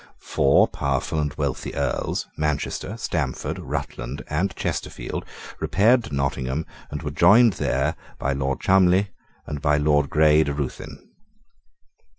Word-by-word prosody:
Four 70 Hz, -, +4 dB
powerful 70 Hz, +3 st, -2 dB
and 75 Hz, -1 st, 0 dB
wealthy 70 Hz, -3 st, -3 dB
Earls, -, -, -1 dB
Manchester, 75 Hz, -1 st, -2 dB
Stamford, -, -, -3 dB
Rutland, 60 Hz, +4 st, -5 dB
and 85 Hz, +4 st, 0 dB
Chesterfield, -, -, -4 dB, 0.4 s
repaired 115 Hz, +4 st, +3 dB
to 70 Hz, -, -5 dB
Nottingham, 70 Hz, +1 st, -1 dB, 0.2 s
and 75 Hz, -, -6 dB
were 75 Hz, -, -3 dB
joined 100 Hz, +9 st, +6 dB
there -, -, 0 dB, 0.2 s
by 70 Hz, -, -1 dB
Lord 65 Hz, 0 st, -1 dB
Cholmondley 95 Hz, +1 st, +4 dB, 0.4 s
and 75 Hz, -2 st, -5 dB
by 75 Hz, 0 st, +3 dB
Lord 75 Hz, -1 st, +2 dB
Grey 75 Hz, 0 st, +5 dB
de 70 Hz, -, -2 dB
Ruthyn. 70 Hz, -3 st, -6 dB
75 Hz, 130 wpm, -23 LUFS, 70-85 Hz, 0.4 s, joined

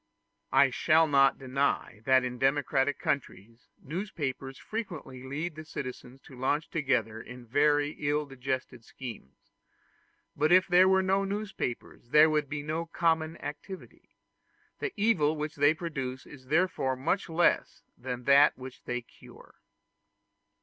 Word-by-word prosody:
I -, -, +5 dB
shall 160 Hz, +1 st, +4 dB
not 135 Hz, -2 st, +4 dB
deny 130 Hz, -4 st, -1 dB
that 130 Hz, -1 st, +5 dB
in 125 Hz, -1 st, -4 dB
democratic 135 Hz, +1 st, +1 dB
countries 115 Hz, -4 st, -4 dB, 0.2 s
newspapers 145 Hz, -6 st, -4 dB
frequently 175 Hz, -, -6 dB
lead 150 Hz, +6 st, -4 dB
the 155 Hz, +1 st, -9 dB
citizens 130 Hz, -3 st, -8 dB
to 130 Hz, -, -14 dB
launch 145 Hz, +5 st, -1 dB
together 120 Hz, -7 st, 0 dB
in 125 Hz, +1 st, -11 dB
very 145 Hz, +4 st, +2 dB
ill 150 Hz, +1 st, 0 dB
digested 130 Hz, -3 st, -5 dB
schemes; 115 Hz, -, -11 dB, 0.8 s
but 155 Hz, +3 st, +1 dB
if 185 Hz, +1 st, +6 dB
there 185 Hz, +1 st, +6 dB
were 190 Hz, 0 st, +4 dB
no 195 Hz, +1 st, +2 dB
newspapers 195 Hz, -, -5 dB
there 155 Hz, +3 st, +6 dB
would 150 Hz, -2 st, 0 dB
be 145 Hz, -1 st, -4 dB
no 160 Hz, +3 st, -3 dB
common 160 Hz, -1 st, 0 dB
activity. 150 Hz, +6 st, -9 dB, 0.6 s
The 405 Hz, -, -2 dB
evil 190 Hz, -8 st, +2 dB
which 155 Hz, 0 st, -4 dB
they 145 Hz, +2 st, +4 dB
produce 135 Hz, -6 st, -5 dB
is 130 Hz, -3 st, -14 dB
therefore 155 Hz, -4 st, +1 dB
much 165 Hz, +9 st, -1 dB
less 170 Hz, +2 st, +1 dB
than 125 Hz, 0 st, -6 dB
that 140 Hz, +3 st, +5 dB
which 130 Hz, 0 st, -10 dB
they 125 Hz, 0 st, -2 dB
cure. -, -, -17 dB
145 Hz, 135 wpm, -29 LUFS, 130-160 Hz, 0.8 s, if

